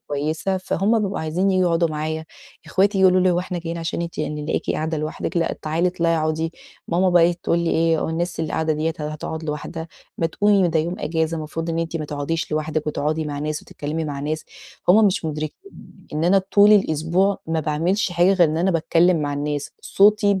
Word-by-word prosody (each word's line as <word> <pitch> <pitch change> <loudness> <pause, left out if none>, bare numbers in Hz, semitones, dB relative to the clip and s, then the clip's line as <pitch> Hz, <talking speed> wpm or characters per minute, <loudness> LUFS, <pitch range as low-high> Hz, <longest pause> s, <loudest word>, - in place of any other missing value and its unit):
كويسة 155 +6 -1
فهُم 200 +4 +1
بيبقوا 200 -1 -2
عايزين 170 +5 0
ييجوا 185 -1 +2
يقعُدوا 170 0 +2
معايا، 155 +1 -3 0.4
إخواتي 195 +5 +2
ييجوا 190 -1 +6
يقولوا 185 0 +3
لي: 185 - +4
"هو 175 - +1
إحنا 180 0 -3
جايين 170 0 -5
عشان 165 +1 -3
أنتِ 170 -2 -7
يعني 150 -1 -3
نلاقيكِ - - -2
قاعدة 160 0 -1
لوحدِك؟ 155 +4 -4
لأ 165 - +1
تعالي 160 +3 +1
اطلعي 170 -2 0
أقعُدي." 155 +1 -1 0.4
ماما 180 +2 +2
بقي 175 -1 +5
إيه 175 - +3
تقول 170 - +1
لي 170 -1 0
إيه 165 -1 +2
"والناس 170 +1 -2
اللي 160 - -3
قاعدة 160 0 0
ديّة 155 +2 -1
هتقعُد 155 +1 -5
لوحدها؟ 160 +2 -5 0.3
ما 165 - +2
تقومي 200 +1 +3
ده 160 0 +1
يوم 170 +3 -3
إجازة 160 +1 -1
المفروض 160 +2 -4
إن 165 - -2
أنتِ 165 0 -2
ما 155 - -3
تقعُديش 150 +2 -3
لوحدِك 155 0 -2
وتقعدي 155 +1 -1
مع 145 -1 -4
ناس 150 +1 -3
وتتكلّمي 155 +2 -4
مع 145 -2 -4
ناس." 155 +2 -3 0.4
هُم 210 +4 +7
مش 180 -3 0
مُدرِكين 155 - -5 0.4
إن 155 +2 -1
أنا 195 +3 +5
طُول 200 +2 +5
الأسبوع 185 +1 +2
ما 160 0 0
باعملش 170 +6 0
حاجة 175 +3 +4
غير 175 -5 +4
إن 155 - -2
أنا 185 +3 +2
باتكلّم 170 +1 +3
مع 145 - -2
الناس، 145 0 -3
صوتي 205 0 +4
ب 190 - -2
165 Hz, 210 wpm, -22 LUFS, 155-180 Hz, 0.4 s, هُم